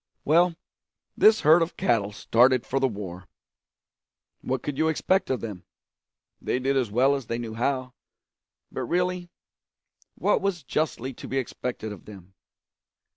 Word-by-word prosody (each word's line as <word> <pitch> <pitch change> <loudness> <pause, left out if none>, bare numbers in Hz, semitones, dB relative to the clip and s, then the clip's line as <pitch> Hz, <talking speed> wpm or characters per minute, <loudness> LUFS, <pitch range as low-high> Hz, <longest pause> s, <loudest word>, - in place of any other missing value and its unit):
Well, 170 +3 +4 0.6
this 220 0 +5
herd 160 +2 +6
of 165 - -2
cattle 105 -4 +1
started 125 +4 +3
for 135 - -1
the 135 - +3
war. 95 -5 -7 1.1
What 130 0 -2
could 145 - -3
you 160 - +3
expect 185 +4 +1
of 130 -2 -1
them? 105 -6 -6 0.8
They - - -1
did 135 +2 0
as 130 -5 +1
well 130 +6 +3
as 135 -5 -4
they 115 - -2
knew 115 -2 -5
how, 130 +2 -1 0.8
but - - -4
really 180 +3 -1 0.9
what - - +1
was 195 -6 -1
justly 135 -2 -2
to - - -10
be 135 - -2
expected 125 -3 -4
of 105 - -10
them? 95 -3 -13
130 Hz, 150 wpm, -26 LUFS, 115-160 Hz, 1.1 s, herd